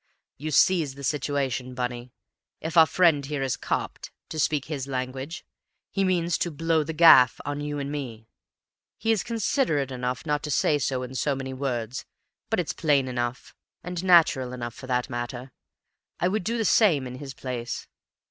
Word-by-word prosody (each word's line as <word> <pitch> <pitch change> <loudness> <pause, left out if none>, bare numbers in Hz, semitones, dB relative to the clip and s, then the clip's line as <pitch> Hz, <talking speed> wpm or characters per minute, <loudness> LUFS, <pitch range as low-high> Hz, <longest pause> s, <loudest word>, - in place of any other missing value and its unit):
"You 155 +2 -4
seize 155 -2 +3
the 140 - -10
situation, 135 -3 -1
Bunny? 125 0 -4 0.5
If 160 +1 -5
our 160 -1 +8
friend 165 -6 +3
here 140 0 -3
is 130 -3 0
'copped,' - - -3 0.2
to 155 - -5
speak 150 -2 +1
his 140 -4 -4
language, 130 +3 -4 0.5
he 195 - 0
means 175 -2 +1
to 175 - 0
'blow 165 0 +1
the 150 - -4
gaff' 155 -6 +7
on 145 0 -3
you 145 0 -3
and 140 0 -4
me. 120 -7 -6 0.7
He 225 - 0
is 220 -4 +2
considerate 215 - 0
enough 125 +1 -3
not 150 -1 0
to 150 - -5
say 145 +1 +2
so 130 -2 -1
in 125 +1 -7
so 140 +2 0
many 135 0 -5
words, 125 -3 -3 0.5
but 225 - +1
it's 170 - -1
plain 145 -5 +2
enough, 120 0 -3 0.3
and 180 0 -4
natural 160 -8 +4
enough 120 -2 -5
for 130 - -11
that 125 -1 0
matter. 120 0 -5 0.7
I 180 - +2
would 210 0 -1
do 230 +5 -1
the 225 - 0
same 170 - +4
in 125 0 -7
his 135 -2 -8
place. 125 -2 -5
140 Hz, 180 wpm, -26 LUFS, 130-160 Hz, 0.7 s, our